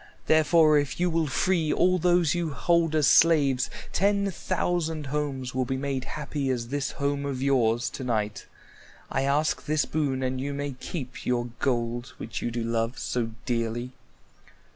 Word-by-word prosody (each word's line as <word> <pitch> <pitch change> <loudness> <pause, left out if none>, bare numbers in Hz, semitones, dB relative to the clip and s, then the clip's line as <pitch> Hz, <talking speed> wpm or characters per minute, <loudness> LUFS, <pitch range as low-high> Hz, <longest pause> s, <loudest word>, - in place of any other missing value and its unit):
Therefore 155 -1 +5
if 145 +2 -3
you 175 0 +2
will 165 -1 +1
free 165 +2 +1
all 185 0 +3
those 175 -3 +3
you 175 -2 -1
hold 165 +5 +2
as 155 -2 +3
slaves, 140 -4 +4 0.2
ten 200 +1 +2
thousand 170 -4 -1
homes 135 -3 -3
will 130 0 0
be 130 +1 -2
made 135 -1 -2
happy 145 -2 -3
as 120 -2 -2
this 145 +1 -2
home 140 0 -1
of 140 -2 -3
yours 120 -4 +2
to - - -6
night. 105 -4 -2 0.6
I 135 - 0
ask 145 +3 +1
this 155 0 +1
boon, 140 -4 -1
and 130 0 -1
you 140 +1 -3
may 145 0 -3
keep 130 0 -7
your 120 -1 0
gold 120 -1 -1
which 115 - -5
you - - -1
do 120 0 -3
love 115 +2 -1
so 120 -2 -2 0.2
dearly." 120 0 -2
140 Hz, 165 wpm, -27 LUFS, 125-155 Hz, 0.6 s, Therefore